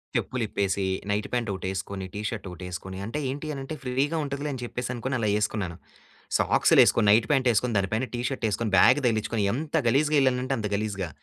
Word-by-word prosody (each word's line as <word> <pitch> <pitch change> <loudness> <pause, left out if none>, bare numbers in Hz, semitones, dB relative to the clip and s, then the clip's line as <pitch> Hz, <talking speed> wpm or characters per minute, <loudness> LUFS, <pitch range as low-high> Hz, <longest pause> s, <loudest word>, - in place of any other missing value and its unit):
చెప్పులు 125 -2 -1
ఇప్పేసి, 100 -1 -1 0.3
night 105 +1 -1
pant 120 -3 0
ఒకటి 95 -1 -5
వేసుకొని, 95 0 -5
టీ 105 - -4
షర్ట్ 105 -4 -6
ఒకటి 90 +1 -10
వేసుకొని, 95 +1 -6
అంటే 115 +7 -3
ఏంటి 145 +4 -4
అని 135 - -5
అంటే 155 +4 -5
ఫ్రీగా 135 +5 0
ఉంటదిలే 140 +1 -3
అని 125 - -6
చెప్పేసి 125 +1 -4
అనుకోని 130 +2 -2
అలా 110 -2 +1
వేసుకున్నాను. 105 -5 -2 0.6
సాక్స్‌లు - - +4
వేసుకొని, 105 - +3
నైట్ 110 +1 +4
పాంట్ 135 -3 +3
వేసుకొని 115 +1 0
దానిపైన 110 +6 0
టీ 120 - -2
షర్ట్ 130 -4 -3
వేసుకొని 105 0 -2
బ్యాగ్ 145 - +6
తగిలించుకొని, 110 -1 0
ఎంత 155 +5 -2
గలీజ్‌గా 150 +5 +3
వెళ్ళానంటే 130 0 +1
అంత 105 - -2
గలీజ్‌గా. 100 -4 -2
115 Hz, 200 wpm, -26 LUFS, 100-130 Hz, 0.6 s, బ్యాగ్